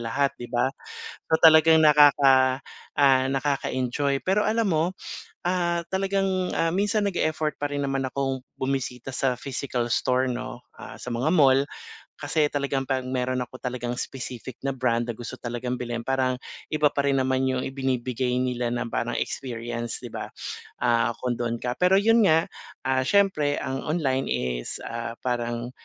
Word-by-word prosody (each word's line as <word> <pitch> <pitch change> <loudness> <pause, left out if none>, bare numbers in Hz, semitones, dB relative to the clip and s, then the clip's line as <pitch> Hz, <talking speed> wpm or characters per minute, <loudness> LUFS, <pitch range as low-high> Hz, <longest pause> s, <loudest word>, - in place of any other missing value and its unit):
lahat, 140 +2 +1
'di 120 - -6
ba? 120 +2 +1 0.6
So 160 - +4
talagang 160 0 +7
nakaka 140 -4 +6 0.4
ah, 135 -2 +5
nakaka-enjoy 140 -1 0
pero 195 +3 +3
alam 225 0 +1
mo, 160 -4 +2 0.6
ah, 175 -1 0
talagang, 190 -1 0
ah, 165 0 +1
minsan 205 +3 +1
nag-e-effort 155 -6 -1
pa 145 - 0
rin 145 0 -3
naman 135 -1 -1
akong 135 0 -2 0.2
bumisita 130 -1 -3
sa 130 -1 0
physical 125 -2 -3
store 130 +1 +1
'no, 125 0 -6 0.2
ah, - - -9
sa 125 - -7
mga 120 +6 0
mall 135 -2 +5 0.5
kasi 150 +1 +2
talagang 140 -2 -1
'pag 130 -1 0
meron 130 0 -1
ako 125 +1 -7
talagang 125 -1 -4
specific 125 -1 -6
na 140 - -1
brand 120 -2 0
na - - -1
gusto 120 - -6
talagang 120 +1 -3
bilhin 120 -2 -4
parang 130 -1 +1 0.3
iba 150 -1 +1
pa 140 - +1
rin 140 -1 +2
naman 130 0 +1
'yung 130 -1 -1
ibinibigay 130 -2 -1
nila 125 -1 -1
na 120 0 -2
parang 120 0 -2
experience 120 -2 -4
'di - - -9
ba, - - -5 0.5
ah, 120 -1 +2
kung 125 -2 -1
do'n 120 -1 -2
ka. 125 0 -2
Pero 185 +2 +4
'yun 225 +1 +4
nga, 165 -3 +4 0.4
ah, 130 0 +2
siyempre 155 -5 +2
ang 135 0 -3
online 135 -5 0
is, - - -3
ah, 115 0 -4
parang, 120 -1 -2
130 Hz, 160 wpm, -25 LUFS, 125-150 Hz, 0.6 s, talagang